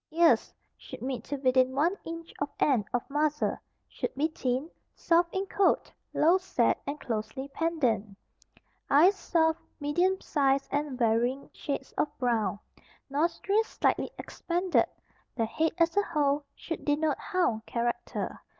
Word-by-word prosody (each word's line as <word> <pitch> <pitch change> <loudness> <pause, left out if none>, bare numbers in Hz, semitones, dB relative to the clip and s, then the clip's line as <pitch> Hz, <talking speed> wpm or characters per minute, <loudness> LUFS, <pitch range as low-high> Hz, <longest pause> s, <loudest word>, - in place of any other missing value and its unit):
Ears 330 +1 +4 0.2
should - - -10
meet 255 -3 -3
to 285 - -3
within 260 -1 +2
one 330 +7 +2
inch 330 0 -7
of 285 - -1
end 250 -8 +3
of 245 - -1
muzzle, 295 +1 0 0.3
should - - -4
be 300 +4 +1
thin, 260 -1 -2 0.3
soft 340 0 +2
in 380 +1 0
coat, 395 0 +2 0.2
low 340 +5 +4
set 375 - +1
and 290 +2 -3
closely 235 +4 -4
pendant. 250 -11 0 0.7
Eyes 345 +8 +6
soft, 320 -3 +1 0.2
medium 350 +6 +1
size, 275 -2 +1
and 285 -2 -1
varying 240 +3 +1
shades 280 -2 -4
of - - +3
brown. 230 -5 +1 0.5
Nostrils 345 +9 +1
slightly - - 0
expanded. 355 +1 0 0.5
The 225 - +1
head 320 +8 0
as 335 -1 +2
a 405 - +5
whole 290 -5 0
should 330 - -6
denote 295 0 +1
hound 295 -13 0
character. 240 0 -2
290 Hz, 140 wpm, -29 LUFS, 255-335 Hz, 0.7 s, Eyes